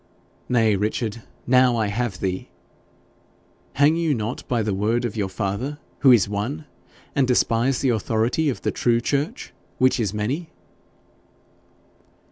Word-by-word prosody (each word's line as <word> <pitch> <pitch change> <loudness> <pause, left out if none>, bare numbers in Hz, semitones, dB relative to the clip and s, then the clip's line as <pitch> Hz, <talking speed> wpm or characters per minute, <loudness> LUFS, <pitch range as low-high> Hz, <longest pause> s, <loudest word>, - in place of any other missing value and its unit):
'Nay, 115 -4 +3
Richard, 110 +2 -2 0.2
now 125 0 +4
I 110 - +1
have 105 -1 -3
thee! 95 -1 -3 1.2
Hang 145 +3 +4
you 165 -3 +1
not 110 +2 -4
by 120 -3 0
the 105 -1 -1
word 110 +5 0
of 115 - -4
your 100 -3 -1
father, 100 +10 -3 0.2
who 135 - +6
is 115 -6 +5
one, 120 +10 -3 0.5
and 135 -3 +2
despise 125 +1 +2
the 135 - +2
authority 115 +6 +1
of 130 - -4
the - - 0
true 120 -1 +1
church, 140 +5 -2 0.2
which 130 0 +3
is 105 -5 0
many?' 130 +11 -3
120 Hz, 140 wpm, -23 LUFS, 105-130 Hz, 1.2 s, who